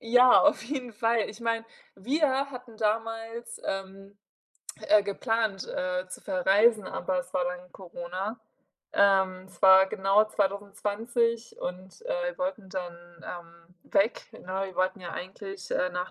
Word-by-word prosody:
ja, 245 +2 +6
auf 300 - +4
jeden 250 -2 -4
Fall. 225 0 +1
Ich 215 - -10
meine, 230 -1 -1 0.3
wir 275 +4 +1
hatten 250 -3 -10
damals, 225 +2 -2
ähm, 195 +1 -5 0.7
äh, 210 -1 +6
geplant, 215 -1 -1
äh, 180 0 -2
zu - - -9
verreisen, 200 +3 +3
aber 185 0 -2
es - - -13
war 180 - +2
dann 180 0 -5
Corona. 185 +4 -6 0.5
Ähm, 190 -2 +3
es 185 -2 -20
war 190 0 +8
genau 195 +2 +3
2020 215 +3 -1
und, 185 - -7
äh, - - -1
wir - - -21
wollten 275 -8 -3
dann, 175 -2 -8
ähm, 170 0 -10 0.2
weg, 205 +4 +2
ne? 190 +1 -4
Wir 190 - -10
wollten 185 +2 0
ja 175 -2 -7
eigentlich, 195 +1 -8
äh, 180 - +1
nach 180 +1 -3
200 Hz, 145 wpm, -28 LUFS, 185-230 Hz, 0.7 s, war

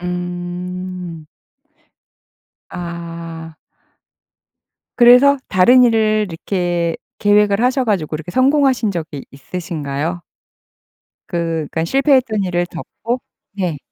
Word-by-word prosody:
음. 180 -1 -5 1.4
아. 165 -2 -7 1.4
그래서 250 +4 +7
다른 245 +7 +6
일을 215 -2 +2
이렇게 175 -1 -2 0.2
계획을 205 0 +3
하셔 255 +1 +2
가지고 175 -8 -1
이렇게 160 +3 -8
성공하신 260 -3 +3
적이 160 -6 -5
있으신가요? 155 +1 -4 1.1
그 165 -2 -2
그러니까 160 0 -1
실패했던 260 - +2
일을 175 -1 0
덮고 230 +8 -5 0.3
네. 180 -7 -2
180 Hz, 205 characters per minute, -18 LUFS, 165-220 Hz, 1.4 s, 그래서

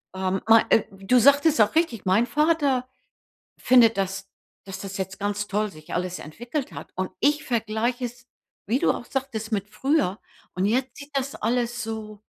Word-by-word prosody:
ähm, 190 0 -1
ma 225 0 +7
äh, 225 - +5
du 195 +6 +2
sagtest 285 +4 +5
auch 210 +5 +3
richtig, 320 - +1
mein 190 +5 +3
Vater 295 -5 +1 0.7
findet, 235 -3 +5
dass 195 0 -3 0.4
dass 195 0 -7
das 195 0 -6
jetzt 190 0 -5
ganz 205 0 -2
toll 210 +1 -1
sich 155 -3 -11
alles 180 0 -2
entwickelt 240 - -5
hat - - -9
und 185 0 -3
ich 295 +4 +2
vergleiche 235 +1 -1
es, 245 0 -9 0.4
wie 235 +6 +1
du - - +3
auch - - -5
sagtest, 235 -5 -4
mit 205 -1 -2
früher. 265 - 0 0.4
Und 185 +1 0
jetzt 255 +4 0
sieht 285 +1 -11
das 275 0 -1
alles 240 +2 -1
so, 215 -2 -7
225 Hz, 175 wpm, -25 LUFS, 195-255 Hz, 0.7 s, ma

